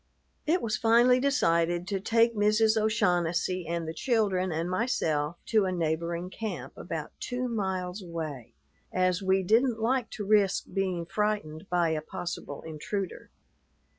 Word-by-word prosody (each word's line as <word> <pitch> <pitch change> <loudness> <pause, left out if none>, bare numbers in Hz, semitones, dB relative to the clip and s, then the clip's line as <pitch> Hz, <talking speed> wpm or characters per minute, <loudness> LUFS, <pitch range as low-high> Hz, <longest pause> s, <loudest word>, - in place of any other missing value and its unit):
It 350 +4 +2
was 215 -2 0
finally 240 +2 +5
decided 175 - +2
to 195 -2 -1
take 230 +3 +3
Mrs. 215 +1 +3
O'Shaughnessy 180 -5 +1
and 170 -1 -2
the 160 - -3
children 195 -3 +1
and 165 +2 -1
myself 175 - 0
to 215 -3 +4
a 185 - 0
neighboring 170 +1 -2
camp 180 - -5
about 160 -3 -5
two 250 0 -2
miles 190 -4 -2
away, 160 -8 -6 0.4
as 185 0 +1
we 190 0 +2
didn't 225 +4 +3
like 245 +2 +1
to 210 - -4
risk 200 -2 +3
being 185 -3 -1
frightened 200 -4 -2
by 175 -2 +2
a 155 -1 -1
possible 155 -3 -6
intruder. 170 +5 -5
185 Hz, 140 wpm, -28 LUFS, 170-220 Hz, 0.4 s, finally